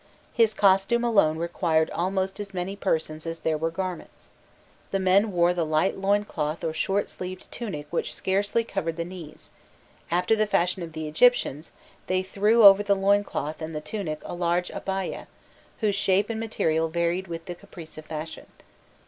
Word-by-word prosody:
His 225 -4 +3
costume 195 +4 +3
alone 200 -10 +3
required 165 -1 0
almost 190 +2 -1
as 200 -2 -7
many 185 +2 -3
persons 160 -4 -2
as 165 0 -5
there 160 - +1
were 160 +2 -1
garments. 185 +1 -6 0.6
The 195 - 0
men 195 +3 +3
wore 175 -1 +3
the 175 -1 0
light 155 +4 +1
loin 200 +2 +1
cloth 155 -3 -3
or 160 -1 -1
short 195 +5 0
sleeved 185 0 -8
tunic 190 -11 -5
which 170 - -1
scarcely 200 +4 0
covered 180 -7 -3
the 170 0 -3
knees; 175 -4 -11 0.6
after 180 +6 +2
the 215 -1 +1
fashion 180 -1 +1
of 165 -2 -7
the 155 0 -4
Egyptians, 155 - +2 0.4
they 185 0 +1
threw 210 +4 +3
over 200 0 +9
the 205 -1 +2
loin 200 +1 +3
cloth 155 -5 -4
and 160 0 -5
the - - -1
tunic 155 -2 -4
a - - -6
large 175 0 0
"abayah," 190 -1 -4 0.5
whose 210 -2 +2
shape 200 +2 +2
and 220 - -3
material 165 -8 0
varied 170 +3 -1
with 165 -1 -6
the 175 - -5
caprice 175 -3 -12
of 155 - -10
fashion. 160 +1 -7
185 Hz, 175 wpm, -26 LUFS, 165-200 Hz, 0.6 s, over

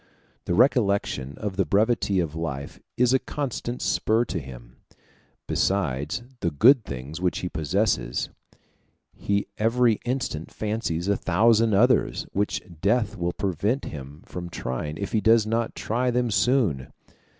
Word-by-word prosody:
The 85 - 0
recollection 100 - +2
of 100 -3 -4
the 95 - +3
brevity 100 +2 +2
of 80 -4 -1
life 70 -4 -5 0.2
is 125 +1 +4
a 130 - +4
constant 125 -4 -4
spur 115 +2 +2
to 90 - -3
him. 60 -3 -11 0.7
Besides 75 - -1 0.2
the 85 - 0
good 115 - +5
things 70 +4 -7
which 90 -1 0
he 90 - -3
possesses, 80 - 0 0.8
he 100 0 -1
every 115 0 +3
instant 120 - -3
fancies 105 -6 -2
a 100 - +3
thousand 110 +4 +3
others 125 +5 +3
which 100 +1 -1 0.2
death 110 +1 +1
will 90 -3 -1
prevent 100 - -1
him 70 0 -9
from 90 -1 -7
trying 75 -1 -4
if 100 - -4
he 110 - +1
does 110 0 +5
not 115 +1 -1
try 125 +3 -1
them 120 -1 0
soon. 95 - +1
100 Hz, 140 wpm, -25 LUFS, 80-115 Hz, 0.8 s, good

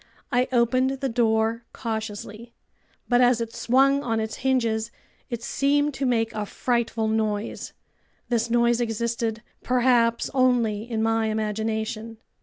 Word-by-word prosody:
I 250 +1 +2
opened 255 +1 +3
the 270 - -1
door 225 -1 +1
cautiously, 220 0 -5 0.5
but 245 0 +3
as 245 -1 +4
it 230 -1 -4
swung 275 +3 +3
on 225 -4 -1
its 220 0 -3
hinges, 230 -4 0 0.4
it 235 -2 -5
seemed 290 +3 +1
to 270 0 -1
make 225 -2 +1
a 210 -1 -3
frightful 235 -2 -1
noise. 220 -1 -2 0.5
This 235 -1 0
noise 235 0 +3
existed, 230 -1 -2 0.2
perhaps, 245 -2 +2
only 240 -4 +1
in 220 -2 -1
my 225 0 +1
imagination! 220 +1 -3
230 Hz, 130 wpm, -25 LUFS, 220-245 Hz, 0.5 s, as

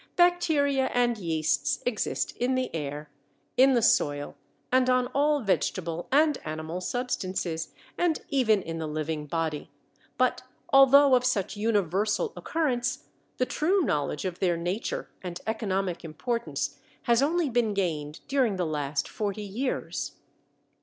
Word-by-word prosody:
Bacteria 320 -6 +3
and 240 -1 +3
yeasts 155 -5 0
exist 240 -4 -1
in 255 +2 +1
the 255 -8 -2
air, 150 -1 -5 0.4
in 265 +1 +6
the 235 - +2
soil, 145 -9 +2 0.4
and 255 0 +4
on 255 0 +3
all 290 +1 +2
vegetable 175 -5 -1
and 295 0 +4
animal 155 +3 -5
substances, 185 -8 -2 0.3
and 345 -3 +2
even 220 -8 +3
in 165 0 -5
the 160 - -3
living 155 0 -3
body, 160 -1 -2 0.5
but 255 -1 +2 0.3
although 275 +1 +7
of 250 -1 +5
such 215 -5 0
universal 210 - 0
occurrence, 255 -6 -1 0.3
the 255 - +2
true 365 +9 +1
knowledge 150 - -1
of 180 -2 -4
their 175 -3 +1
nature 175 +6 -3
and 180 -2 -6
economic 195 -5 -2
importance 230 +9 -3 0.2
has 235 0 +3
only 325 +3 +2
been 235 -4 +1
gained 155 -6 -2
during 260 -7 +2
the 180 -2 -1
last 145 -2 -2
forty 210 0 -3
years. 230 +7 -3
210 Hz, 135 wpm, -27 LUFS, 165-255 Hz, 0.5 s, although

